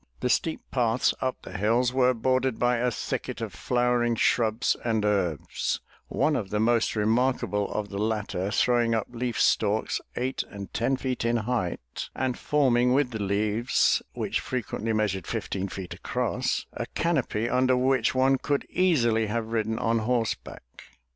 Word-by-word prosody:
The 125 - 0
steep 160 +5 +1
paths 120 -1 +2
up 130 -1 -2
the - - -9
hills 115 +5 +2
were 130 -1 +3
bordered 130 +1 +1
by 120 0 +2
a 125 +1 +1
thicket 120 - -4
of - - -5
flowering 120 -1 +1
shrubs 115 +1 +2
and 110 -3 0
herbs, 95 -8 -1 0.3
one 155 - +1
of 105 -7 -2
the 105 - -1
most 115 +1 +2
remarkable 110 -1 +1
of 105 -1 -3
the 100 - -5
latter 105 -3 -1
throwing 120 +1 +2
up 110 - 0
leaf 120 -1 -3
stalks 105 0 +2
eight 130 +2 -1
and 100 -1 -9
ten 130 +3 +1
feet 130 -2 -2
in 115 0 +2
height 90 - -3
and 130 -1 -1
forming 125 -4 +3
with 135 -2 +2
the 110 -2 -4
leaves 105 +4 +2
which - - -1
frequently 115 -2 -3
measured 105 -5 -1
fifteen 95 0 -3
feet 95 -1 -7
across, - - -2
a - - -4
canopy 135 -9 0
under 130 +1 +3
which 130 -2 +2
one 130 +1 +3
could 145 -2 -1
easily 120 -12 +2
have 110 +1 -2
ridden 110 -1 0
on 115 0 +1
horseback. 115 - -2
115 Hz, 160 wpm, -27 LUFS, 105-125 Hz, 0.3 s, were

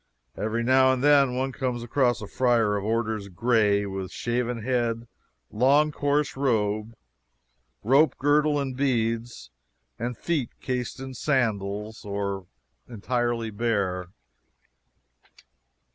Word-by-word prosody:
Every 110 +2 -2
now 130 +1 +5
and 130 0 -1
then 140 -3 +5
one 135 +1 -1
comes 125 -3 -3
across 120 -2 +1
a - - -6
friar 115 -4 +2
of 100 - -2
orders 110 -1 -1
gray, 105 0 +2
with 95 -1 -5
shaven 120 -1 -2
head, 120 -2 -1 0.4
long, 140 +7 +3
coarse 145 0 0
robe, 110 -4 0 0.9
rope 135 +5 +4
girdle 145 +1 +2
and 135 -2 -3
beads, 115 - -1 0.5
and 120 +2 -3
with - - -26
feet 150 -9 0
cased 125 -1 -3
in 135 0 -7
sandals 110 -6 -1
or 100 -2 -3 0.4
entirely 120 0 -2
bare. 100 -5 -1
120 Hz, 115 wpm, -26 LUFS, 105-130 Hz, 0.9 s, now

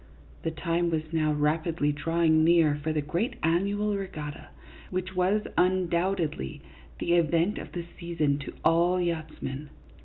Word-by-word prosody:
The - - -1
time 170 +1 0
was 160 -1 -2
now 155 -1 +2
rapidly 150 +1 +1
drawing 160 +2 +2
near 165 -2 +5
for 150 +2 -2
the 155 -1 0
great 205 - -1
annual 200 +5 +1
regatta, 155 -7 -6 0.4
which 185 0 -3
was, 190 +4 +2
undoubtedly, 180 - 0 0.3
the 170 - 0
event 170 +3 +2
of - - -8
the 175 -1 -4
season 155 -5 0
to 135 - -7
all 175 +2 +4
yachtsmen. 155 -4 -3
165 Hz, 135 wpm, -28 LUFS, 155-180 Hz, 0.4 s, near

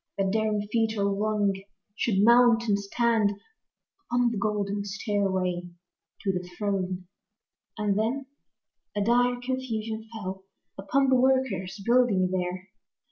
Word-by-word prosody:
That 195 -1 +1
daring 215 -1 +1
feet 225 -1 +1
ere 200 - +1
long 205 0 +1 0.4
should 205 -3 +1
mount 235 0 +6
and 200 -1 +2
stand 215 0 +1 0.8
Upon 245 0 +2
the 230 - -3
golden 205 -1 -1
stairway 190 -3 -1 0.5
to 195 - +2
the 180 -1 -4
throne. 185 -3 -2 0.7
And 210 -1 +1
then 255 +5 -1 0.7
a 205 - +1
dire 245 +2 +3
confusion 225 -4 -4
fell 190 -4 -6 0.3
Upon 265 +8 +1
the 260 - +5
workers, 235 -8 +1
building 235 -7 +3
there. 185 +1 -3
210 Hz, 125 wpm, -27 LUFS, 195-235 Hz, 0.8 s, mount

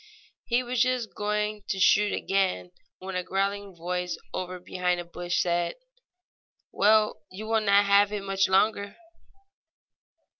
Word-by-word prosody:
He 245 +1 +1
was 245 0 -1
just 250 -3 0
going 210 0 -2
to 195 - -1
shoot 205 +2 +4
again 190 -2 -1 0.3
when 190 0 -7
a 180 - 0
growling 195 +1 -2
voice 180 +1 -3 0.2
over 185 0 -4
behind 180 0 -1
a 175 - -6
bush 175 +1 -3
said: 175 -1 -1 1.0
"Well, 215 -2 +3
you 200 +4 -8
will 225 0 +1
not 200 -1 +4
have 200 0 +4
it 205 -2 -4
much 195 -1 +1
longer." 200 +1 +1
195 Hz, 140 wpm, -27 LUFS, 180-210 Hz, 1.0 s, shoot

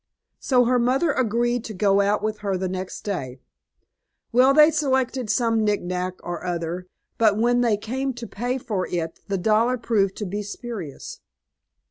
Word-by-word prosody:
So 250 -2 +3
her 250 +1 +3
mother 265 +7 +2
agreed 240 -1 0
to 215 - -6
go 200 +1 +3
out 205 +1 +1
with 215 0 -2
her 200 -2 -1
the 185 0 -2
next 185 0 -5
day. 135 -11 -4 0.9
Well, 255 +3 +5
they 300 +2 +7
selected 265 -5 0
some 225 -1 +2
nicknack 185 -3 -1
or 175 -1 -5
other, 175 0 -3 0.3
but 215 -3 +4
when 240 +2 +3
they 230 -4 +2
came 260 +6 -3
to 240 -1 -7
pay 245 +5 -3
for 205 -7 -3
it 165 -2 -3
the 200 -1 -1
dollar 220 +6 +2
proved 205 -5 +1
to 210 - -4
be 205 +3 -3
spurious." 205 - -7
215 Hz, 165 wpm, -23 LUFS, 190-245 Hz, 0.9 s, they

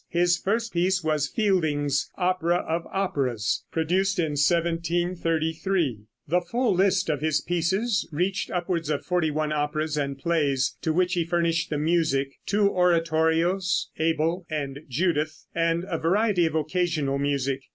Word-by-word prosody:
His 175 0 +3
first 225 +6 -2
piece 180 +1 +1
was 155 -2 +1
Fielding's 150 - 0
"Opera 180 -1 +1
of 165 +1 -2
Operas," 135 - -1
produced 185 +5 +1
in 160 -4 0
1733. 165 - 0 0.3
The 175 +4 +2
full 240 +5 0
list 190 +1 +2
of 150 -3 -1
his 155 -1 +1
pieces 190 +6 0
reached 180 +6 -1
upwards 175 -3 -2
of 150 -2 -2
forty 175 -3 +1
one 155 0 -1
operas 150 +1 -1
and 140 -2 -2
plays 140 -3 0
to 160 - 0
which 180 +3 +1
he 175 -3 +1
furnished 170 0 0
the 150 - -1
music, 150 -3 +1 0.2
two 205 0 +3
oratorios, 170 +1 +1
"Abel" 165 +2 0
and 140 -3 -3
"Judith," 155 +2 -1
and 165 +1 0
a 165 - -2
variety 185 +1 +2
of 160 - -4
occasional 155 -3 0
music. 140 -1 -1
165 Hz, 140 wpm, -25 LUFS, 150-180 Hz, 0.3 s, His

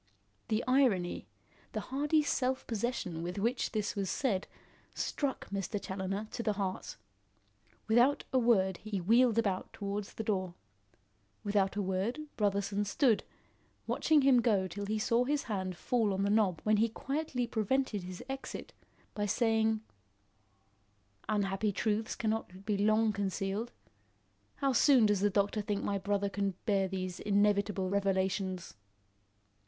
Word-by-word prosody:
The 220 +1 0
irony, 245 -10 +2 0.5
the - - -1
hardy 295 +3 +2
self 260 -2 0
possession 220 -7 -2
with 175 +2 -4
which 235 +5 0
this 215 -2 -2
was 195 -2 -2
said 210 -9 0 0.5
struck 280 -7 -2
Mr. 200 +1 -2
Challoner 195 +2 -4
to 235 - -4
the 215 -2 0
heart. 195 -2 -4 0.9
Without 240 +6 +4
a 260 - +5
word 190 -6 +3
he 215 0 -4
wheeled 230 +5 +4
about 200 -5 0
towards 200 0 -4
the 220 - -3
door. 185 -4 -1 0.9
Without 200 -2 +1
a 205 - 0
word, 190 +9 -1
Brotherson 200 0 0
stood, 225 +2 +2 0.6
watching 305 -3 +3
him 260 -3 +6
go 205 -5 +2
till 200 +3 -5
he 215 +1 0
saw 230 +2 +2
his 290 +3 0
hand 190 -5 -3
fall 220 -4 +1
on 195 - 0
the 200 - +1
knob 205 -6 +2
when 215 0 +3
he 225 +2 +3
quietly 270 +1 -2
prevented 235 -1 0
his 180 0 -8
exit 270 0 -6 0.4
by 205 -2 -1
saying: 220 0 +2 1.5
"Unhappy 205 0 +1
truths 215 +2 -1
cannot 215 -4 -3
be 210 -1 +1
long 215 +2 +3
concealed. 200 +3 -2 0.8
How 275 -2 +1
soon 255 -1 +6
does 210 -2 +3
the 205 +2 +3
doctor 205 +2 +1
think 205 -1 -2
my 200 -1 -1
brother 200 +1 0
can 200 -1 -2
bear 195 -4 +2
these 185 -1 -4
inevitable 205 -1 +2
revelations?" 190 -1 -1
205 Hz, 140 wpm, -32 LUFS, 195-230 Hz, 1.5 s, him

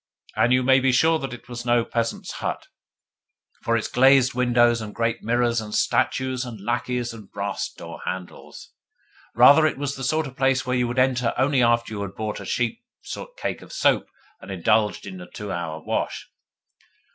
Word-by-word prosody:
And 120 - +3
you 125 0 +4
may 130 +1 +5
be 130 0 +2
sure 160 +6 +3
that 135 -3 -5
it 120 -1 -10
was 120 0 -6
no 120 -1 +2
peasant's 115 -1 -3
hut, - - -3 1.0
with 115 0 +3
its 110 - -2
glazed 130 0 +4
windows 120 -1 +3
and 105 -1 -7
great 115 0 -1
mirrors 120 0 +1
and 105 -1 -6
statues 130 -1 0
and 120 -4 -8
lacqueys 120 +2 -2
and 110 -4 -12
brass 100 0 -3
door - - -10
handles! 95 -1 -7 0.6
Rather, 140 +6 +7
it - - -3
was 140 0 -3
the 135 - -7
sort 155 +4 +1
of 135 -2 -9
place 135 0 +1
which 125 0 0
you 125 - +1
would 120 +2 -4
enter 125 -2 +2
only 135 0 +2
after 120 -1 +2
you 100 - -4
had 100 -1 -6
bought 110 -1 -4
a - - -8
cheap 125 - -1 0.5
cake - - -3
of - - -13
soap - - +1 0.3
and - - -12
indulged 105 +3 +1
in 95 -2 -8
a 90 - -11
two 105 +1 -7
hours' 80 -2 -4
wash. - - -3
120 Hz, 190 wpm, -24 LUFS, 110-130 Hz, 1.0 s, Rather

